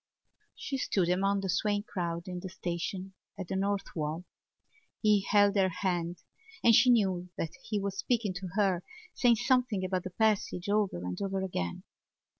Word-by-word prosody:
She 270 - -4
stood 185 -8 +1
among 195 +2 +2
the 195 - -3
swaying 205 +3 +1
crowd 170 -3 -4
in 180 -1 -4
the 185 - -6
station 185 +2 -4 0.2
at 190 -3 -5
the - - -2
North 200 +1 -1
Wall. 160 +2 -3 0.7
He 210 -2 +4
held 205 0 +5
her 190 -2 +4
hand 175 -1 -2 0.4
and 235 - +7
she 250 - +6
knew 190 -6 +2
that 160 - -3
he 210 - -1
was 195 0 -3
speaking 230 -6 0
to 185 +1 -5
her, 195 -4 +2 0.3
saying 245 -2 +4
something 245 -4 +1
about 185 0 -1
the 185 - -4
passage 200 -2 0
over 205 - +1
and 90 0 -4
over 195 -1 -1
again. 90 - -3
190 Hz, 170 wpm, -30 LUFS, 180-205 Hz, 0.7 s, and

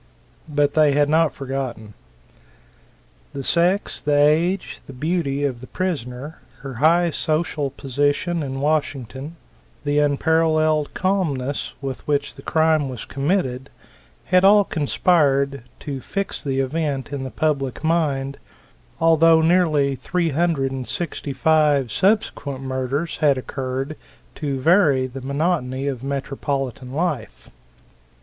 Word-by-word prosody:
But 145 -1 +1
they 155 -2 +4
had 145 0 +3
not 160 -1 +3
forgotten. 130 -6 -5 1.4
The 140 - -5
sex, 175 +7 +1
the 145 0 +1
age, 160 +6 +2
the 135 - -9
beauty 145 0 -1
of 130 -4 -2
the 130 - -10
prisoner; 145 -5 -4 0.2
her 135 -4 -7
high 170 +5 +4
social 155 -2 -1
position 145 +6 -1
in 135 -2 -4
Washington, 145 -1 -2 0.5
the 145 0 +1
unparalled 155 +1 +2
calmness 150 -9 -1
with 135 -2 -6
which 145 -1 0
the - - -13
crime 160 -3 +2
was 125 -3 -7
committed 135 -3 -1 0.6
had 180 0 +3
all 205 +1 +7
conspired 140 -5 +1 0.2
to 140 -3 -5
fix 195 +7 -3
the 135 -2 -1
event 145 0 -2
in 140 -2 -3
the 130 - -4
public 140 -2 -1
mind, 145 -4 0 0.6
although 165 0 +5
nearly 160 -4 +3
three 165 +8 -1
hundred 150 -3 0
and 130 -2 -5
sixty 175 -6 -4
five 145 -4 +2
subsequent 185 - 0
murders 130 +4 -2
had 145 -3 +3
occurred 135 +3 -4 0.4
to 140 -3 -3
vary 150 -4 +4
the 130 +1 -7
monotony 140 -1 -1
of 135 -3 -3
metropolitan 135 -1 -3
life. 145 - -3
145 Hz, 125 wpm, -22 LUFS, 135-160 Hz, 1.4 s, all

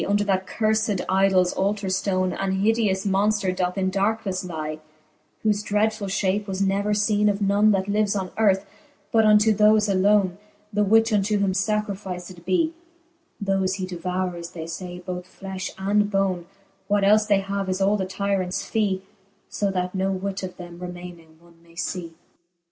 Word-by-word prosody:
Under 205 +1 +2
that 190 -2 0
curfed 215 -2 0
idols 190 -1 +3
altar 200 +1 -1
ftone 185 -1 0
An 190 0 0
hideous 210 -3 +2
monfter 200 -1 +1
doth 180 +1 -1
in 190 -1 0
darknefle 195 -2 -1
lie, 155 -2 -4 0.6
Whole 215 - +4
dreadfuU 210 0 0
fhape 195 +2 0
was 190 -1 -3
never 200 +1 +1
leene 210 0 +2
of 200 0 -1
none, 205 +1 +3
That 195 -2 +1
lives 205 0 +1
on 190 -2 -3
earth; 200 -3 +2 0.5
but 225 -1 +4
unto 210 +1 +5
thofe 215 0 +4
alone. 195 -1 +2 0.3
The 210 +1 +2
which 225 +2 +4
unto 210 +1 +2
him 200 -2 +1
facrificed 190 -3 -3
bee. 315 - +1 0.7
Thole 195 -1 +1
he 190 -1 -3
devoures, 180 -1 -3
they 160 -2 -6
fay, 180 +2 -7
both 180 0 -7
flejPi 190 -1 -5
and 205 +2 +1
bone: 190 -4 0 0.4
What 205 -1 +2
elfe 210 +1 +4
they 200 -2 +3
have, 195 0 -3
is 185 +1 -1
all 195 +2 +3
the 190 -2 -2
tyrants 190 -1 -1
fee; 200 -4 0 0.5
So 200 - -1
that 180 -1 -2
no 190 0 0
whit 195 +1 -3
of 185 -1 -6
them 175 -1 -10
remayning 175 -2 -9
one 170 0 -22
may 170 0 -21
fee. 170 -1 -4
195 Hz, 165 wpm, -24 LUFS, 185-205 Hz, 0.7 s, unto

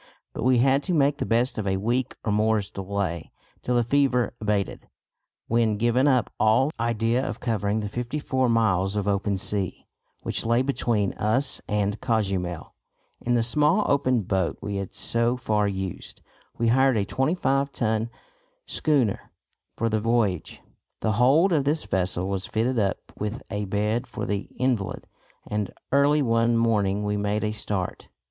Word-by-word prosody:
But - - -5
we 125 +1 +4
had 135 +3 +3
to 180 - 0
make 145 -1 +3
the - - -2
best 120 +2 +1
of 105 - -3
a 95 0 +1
week 120 +5 -1
or 110 - +1
more's 105 -1 +1
delay, 95 -4 -3 0.3
till 125 - -1
the 120 - +3
fever 130 -1 +2
abated, 105 -2 -2 0.6
when, 115 -2 +2
giving 120 +5 +2
up 130 -4 +2
all 110 +7 +3
idea 115 +2 +1
of - - -4
covering 110 -2 -1
the 105 - -3
fifty 120 +7 -4
four 130 -4 0
miles 100 -4 +2
of 105 -1 -1
open 100 0 0
sea, 95 -1 -3 0.4
which - - -2
lay 115 +2 +2
between 115 -7 0
us 115 +7 +1
and 105 0 -1
Cozumel, 95 -7 -1 0.5
in 120 0 +1
the 115 - +2
small 150 - +3
open 130 -5 +2
boat 95 -3 -1
we 100 -1 -4
had 100 -2 -4
so 115 +1 +1
far 105 -4 +1
used, 95 -2 -5 0.3
we 115 -1 +1
hired 130 0 +4
a 100 - +1
25 135 - 0
ton 110 -2 -1 0.6
schooner 135 -10 0 0.5
for 115 - 0
the 110 -1 +1
voyage. 105 -7 0 0.4
The 110 - +1
hold 135 - +4
of 150 -4 +2
this 150 +3 0
vessel 95 -1 -1
was 95 -1 -3
fitted 115 +3 0
up 100 -2 +1 0.2
with 105 +5 -4
a 105 -1 -2
bed 105 +5 -1
for - - -5
the 100 -1 -3
invalid, 120 -8 -1 0.4
and 105 -2 -2 0.2
early 145 +2 +4
one 115 -1 +2
morning 105 -3 +1
we 105 0 -1
made 105 +1 -1
a 105 - 0
start. 100 -4 -3
115 Hz, 165 wpm, -25 LUFS, 100-125 Hz, 0.6 s, we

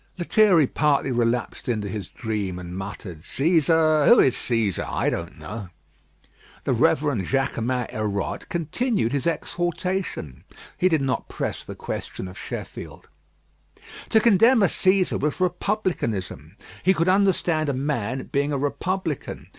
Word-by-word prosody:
Lethierry 180 -2 +4
partly 140 0 +1
relapsed 120 0 -1
into 110 -4 -1
his 100 -2 -5
dream 105 -5 -3
and 90 0 -7
muttered: 95 -4 -7
"Cæsar? 155 - +3
who - - +8
is 130 - +5
Cæsar? 115 -8 0
I - - 0
don't - - -5
know." 105 -3 -7 0.9
The - - +1
Rev. - - +3 0.3
Jaquemin 130 -2 0
Hérode 105 -2 -3
continued 175 - 0
his 140 +3 0
exhortations. 175 - -2 0.3
He 185 - +2
did 160 -4 +2
not 130 -3 -2
press - - -4
the - - -8
question 95 - -5
of 90 - -10
Sheffield. - - -8 1.0
To 220 - +5
contemn 225 +2 +5
a - - +7
Cæsar 185 0 +2
was 150 +4 -1
republicanism. 170 - -2 0.3
He 190 +1 +3
could 165 +1 +1
understand 185 -5 +2
a - - 0
man 130 -2 -2
being 140 +1 +1
a 140 - 0
republican. 160 +3 -3
140 Hz, 135 wpm, -24 LUFS, 110-180 Hz, 1.0 s, who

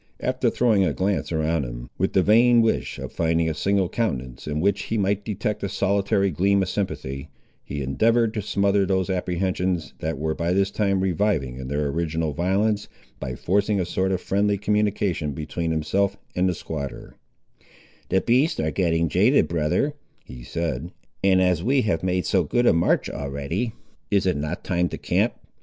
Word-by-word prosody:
After - - 0
throwing 110 -5 +3
a 85 -6 +1
glance 95 +2 -1
around 80 -1 0
him, - - -7
with 95 - 0
the 95 - +4
vain 115 +3 +5
wish 115 - 0
of - - -6
finding 80 0 +1
a 80 - 0
single 95 +4 +1
countenance 65 - -3
in 75 0 -2
which 100 +4 +1
he 115 - -2
might 100 0 0
detect 105 0 -3
a 100 - -2
solitary 100 0 +1
gleam 95 +5 +2
of 90 - -3
sympathy, 70 -9 -4 0.3
he 70 0 -4
endeavoured 110 - +2
to 105 - -2
smother 100 0 +2
those 95 0 0
apprehensions, 90 -1 -1
that 80 -1 -3
were 80 +2 -1
by 85 +2 -1
this 100 +1 +2
time 100 -3 +1
reviving 90 -9 0
in 65 0 -6
their 75 +2 -1
original 80 0 -1
violence, 100 +6 0 0.3
by 65 - -4
forcing 100 - +1
a 90 - 0
sort 95 +2 0
of 95 - 0
friendly 100 +2 +1
communication 100 -7 0
between 80 +3 -3
himself 95 +5 0 0.2
and 90 +1 +2
the 90 - -1
squatter— 70 -5 -6 1.0
"The 95 - +2
beasts 130 +7 +2
are 80 - 0
getting 85 0 +1
jaded, 100 - +3
brother," 85 - 0 0.3
he 60 -1 -10
said, 80 +2 -3 0.3
"and 95 -1 +4
as 90 -3 +2
we 130 +6 +2
have 95 -7 0
made 90 0 0
so 95 -3 +2
good 120 +11 +1
a - - +6
march 85 +1 +2
already, 70 - -3 0.4
is 100 -2 +2
it 90 - +2
not 75 +4 -4
time 90 -1 0
to - - -5
camp. - - 0
90 Hz, 180 wpm, -24 LUFS, 80-100 Hz, 1.0 s, a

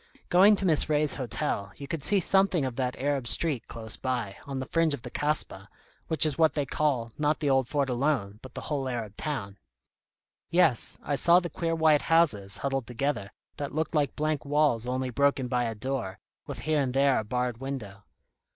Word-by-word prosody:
Going 195 +4 +6
to 195 - -3
Miss 155 -3 +3
Ray's 150 -1 +3
hotel, 110 -5 -3
you 140 - -9
could 165 -1 -4
see 200 +8 +4
something 190 -4 +3
of 130 -2 -4
that 125 -1 -2
Arab 140 -2 -1
street 140 -1 0
close 110 -2 -2
by, 125 -6 -3
on 135 -1 -4
the 130 - -3
fringe 165 0 +1
of 120 - -15
the - - -8
Kasbah 145 -10 -2 0.4
which 160 0 +5
is 155 0 -1
what 160 -1 +4
they 145 -2 0
call, 130 -5 -1
not 150 0 +1
the 145 -3 +1
old 135 -2 +2
fort 140 +1 0
alone, 125 -6 -1
but 130 -2 -12
the - - -5
whole 140 -3 -3
Arab 115 -5 -5
town." 105 -10 -5 0.9
"Yes. 170 -9 +2
I 145 - -2
saw 170 +5 +5
the 175 -2 -6
queer 165 -1 -2
white 155 -2 +4
houses, 105 - +2
huddled 135 -1 -2
together, 120 -5 -2 0.3
that 145 -1 -5
looked 160 +2 -1
like 145 -4 0
blank 155 -1 -1
walls 145 -5 +1
only 130 0 -2
broken 140 0 +1
by 125 -1 0
a 115 -1 -3
door, 110 -5 -3 0.3
with - - -6
here 155 -1 +1
and 130 -2 -2
there 135 -1 +3
a - - -3
barred 125 +1 -2
window." 115 -8 -6
135 Hz, 200 wpm, -27 LUFS, 120-155 Hz, 0.9 s, Going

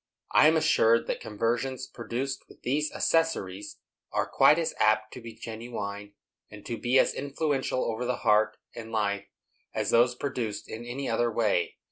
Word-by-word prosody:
I - - +6
am 160 +1 +4
assured 115 -6 +4
that - - -2
conversions 120 +4 -2
produced 130 +3 -5
with - - -18
these 150 +4 0
accessories 105 - 0 0.3
are - - 0
quite 150 - +5
as 165 -1 -1
apt 110 0 +2
to 125 - -8
be 115 -1 -9
genuine, 110 -3 -6 0.4
and 105 -1 -12
to 120 - -3
be 120 +3 +1
as - - +4
influential 140 -2 -1
over 115 +2 -2
the 125 0 0
heart 105 +1 +3 0.2
and 115 -1 -8
life, 100 -2 -1 0.5
as - - 0
those 120 +1 +4
produced 120 -6 -4
in 115 +2 -7
any 130 +3 -4
other 120 +1 +1
way." 105 -7 +1
115 Hz, 165 wpm, -28 LUFS, 110-130 Hz, 0.5 s, I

